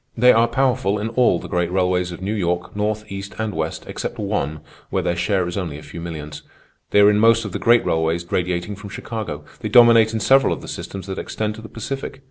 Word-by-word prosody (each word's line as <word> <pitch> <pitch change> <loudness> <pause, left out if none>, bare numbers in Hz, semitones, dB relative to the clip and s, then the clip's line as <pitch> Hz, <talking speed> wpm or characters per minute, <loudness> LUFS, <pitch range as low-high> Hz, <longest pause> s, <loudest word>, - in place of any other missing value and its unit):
They 125 +2 +6
are 115 +1 +4
powerful 120 -5 +1
in 105 +2 -3
all 115 -5 +3
the - - -8
great 90 -1 -1
railways 90 -1 +1
of 90 +2 -8
New 100 +3 -1
York, 90 -3 -2
north, 105 +1 -1
east, 100 0 -6
and 110 -2 -2
west, 80 -1 -3
except - - -5
one, 100 -8 -2 0.3
where - - -1
their 85 - 0
share 90 +1 0
is 90 - -4
only 85 -7 -3
a 75 - -11
few 85 - -9
millions. 75 -3 -7 0.5
They 105 - +5
are 100 +1 +7
in 105 - +2
most 115 +1 +4
of - - -5
the - - -4
great 120 0 +4
railways 80 +1 0
radiating 90 +2 -1
from 105 0 -10
Chicago. 100 -8 -6
They 110 - -4
dominate 115 -1 +7
in 115 - -2
several 135 +5 +4
of - - -7
the - - -9
systems 95 -2 -6
that 95 0 -5
extend 110 0 -3
to 110 - -10
the 110 - -10
Pacific. 135 +4 -6
100 Hz, 235 wpm, -21 LUFS, 85-110 Hz, 0.5 s, are